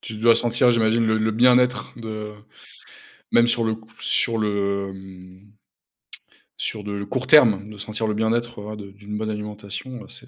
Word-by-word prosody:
Tu 110 - -8
dois 115 +1 +5
sentir, 120 +1 +3
j'imagine, 115 0 +2
le 110 0 +2
le 110 0 +1
bien-être 125 +1 +3
de 110 -2 -6 1.0
même 120 0 +5
sur 115 -1 +1
c 110 - +1 0.3
sur 115 -2 +1
le 100 -2 -1
mhm 95 +1 -14 1.1
sur 105 -2 -4
de 100 0 -4
court 130 +5 -3
terme, 110 -9 +5
de 105 - -11
sentir 110 +2 -4
le 105 - -1
bien-être, 115 +1 -1
voilà, 105 +1 -6
de 100 -1 -9
d'une 100 +1 -9
bonne 110 +1 -3
alimentation, 105 +3 -6
heu, - - -15
c'est, - - -9
110 Hz, 170 wpm, -23 LUFS, 105-115 Hz, 1.1 s, dois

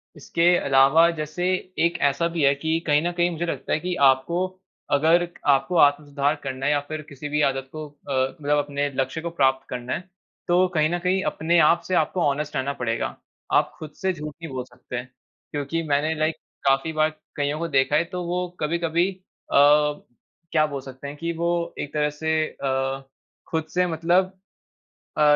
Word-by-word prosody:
इसके 170 +4 +2
अलावा 140 +5 +5
जैसे, 155 +3 -3 0.3
एक 170 +1 +2
ऐसा 140 +4 +2
भी 160 - +1
है 140 0 +5
कि 160 +3 -1
कही 150 0 +4
न 175 +2 -1
कही 175 0 +1
मुझे 170 0 -3
लगता 140 -5 -3
है, - - +1
कि 180 +2 -3
आपको 140 +7 +3 0.4
अगर 165 +4 +4 0.2
आपको 135 +5 +3
आत्म 145 -1 +5
सुधार 145 +1 0
करना 135 -1 -4
है 145 - +3
या 145 - +3
फिर 155 0 -4
किसी 145 +1 -7
भी 150 +1 +1
आदत 135 0 -5
को 155 -1 -6 0.2
अ, - - -1 0.3
मतलब 145 0 +2
अपने 145 0 -1
लक्ष्य 135 +4 -1
को 170 - -3
प्राप्त 135 -4 +1
करना 125 0 -4
है। - - -2 0.5
तो, 180 +1 +4
कही 155 -4 +1
न 175 +1 -1
कही 185 +2 +1
अपने 170 +2 +1
आप 165 +2 +5
से 185 - 0
आपको 170 +3 +1
ऑनेस्ट 145 +1 -1
रहना 135 +2 -1
पड़ेगा। 115 -3 -2 0.4
आप - - +3
खुद 155 -1 -8
से 190 0 +1
झूठ 150 -3 -7
नहीं 165 - -6
बोल 130 -1 -3
सकते 125 - -10
हैं। 125 +1 -6 0.4
क्योंकि 145 +3 -2
मैंने 150 +2 +1
लाइक 155 +1 +1 0.3
काफ़ी 135 +4 +2
बार 155 0 +3 0.3
कइयों 145 +1 -1
को 170 - -2
देखा 140 -1 +2
है, 155 - +4
तो 180 +1 -5
वो 180 +1 -1
कभी-कभी 170 +2 +1
अ, 185 -1 -10 1.0
क्या 155 -1 +4
बोल 140 -2 -5
सकते 130 +1 -9
हैं 145 +1 -8
कि 170 +2 -2
वो 170 +1 0 0.3
एक 145 - -5
तरह 150 -1 +1
से 160 +2 -2
अ, 135 0 -2 0.5
खुद 160 -1 0
से 180 0 +3
मतलब 175 +3 +2 0.9
अ, - - +4
150 Hz, 195 wpm, -24 LUFS, 140-170 Hz, 1.0 s, अलावा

